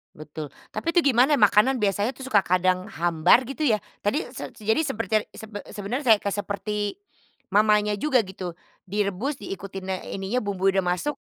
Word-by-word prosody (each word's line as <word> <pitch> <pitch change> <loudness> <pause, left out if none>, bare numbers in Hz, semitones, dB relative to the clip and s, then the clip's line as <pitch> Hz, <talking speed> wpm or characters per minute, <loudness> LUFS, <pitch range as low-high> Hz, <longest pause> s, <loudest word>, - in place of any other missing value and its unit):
Betul. 150 -1 -8 0.2
Tapi 330 - -3
itu 345 - +5
gimana 255 +3 +4
ya 280 - +1
makanan 210 +5 +4
biasanya 205 +4 +1
tuh, 265 +1 -9
suka 205 -6 +4
kadang 185 0 +2
hambar, 175 +2 +3
gitu 290 +3 -3
ya? 220 -7 +3 0.2
Tadi 255 - 0
se - - -8
sejadi 220 +5 0
seperti 230 -5 -4
ya 215 - +2
sebe 215 -2 -8
sebenernya 225 +8 -4
saya 215 - +6
ke - - -2
seperti 205 - -3 0.5
mamanya, 210 +1 +3
juga 260 +3 +2
gitu, 185 -3 -6 0.3
direbus, 205 +8 -2
diikutinnya 190 -1 -5
ininya, 195 +6 -1
bumbunya 195 -1 +1
udah 185 - -7
masuk, 295 +11 -3
205 Hz, 170 wpm, -25 LUFS, 190-240 Hz, 0.5 s, saya